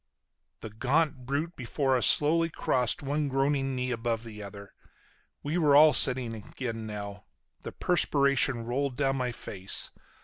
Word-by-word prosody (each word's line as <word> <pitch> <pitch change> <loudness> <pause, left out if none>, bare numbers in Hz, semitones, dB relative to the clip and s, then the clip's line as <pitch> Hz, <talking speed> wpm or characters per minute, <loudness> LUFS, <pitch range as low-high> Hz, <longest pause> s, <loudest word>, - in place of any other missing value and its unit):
The 110 - -8
gaunt 130 +3 -1
brute 150 +6 -3
before 135 +2 -1
us 125 - +3
slowly 165 +3 +3
crossed 125 -4 -1
one 145 +2 -2
groaning 135 0 -1
knee 125 0 -3
above 115 -1 -3
the 110 -2 -10
other. 100 0 -11 0.7
We 155 +5 -2
were 150 -4 +3
all 155 +1 +7
sitting 125 -3 +5
again 115 +1 -7
now. 100 -1 -8 0.4
The - - -7
perspiration 140 -7 +1
rolled 130 +1 -3
down 135 -1 0
my 125 -1 -2
face. 95 -4 -1
130 Hz, 145 wpm, -28 LUFS, 115-145 Hz, 0.7 s, all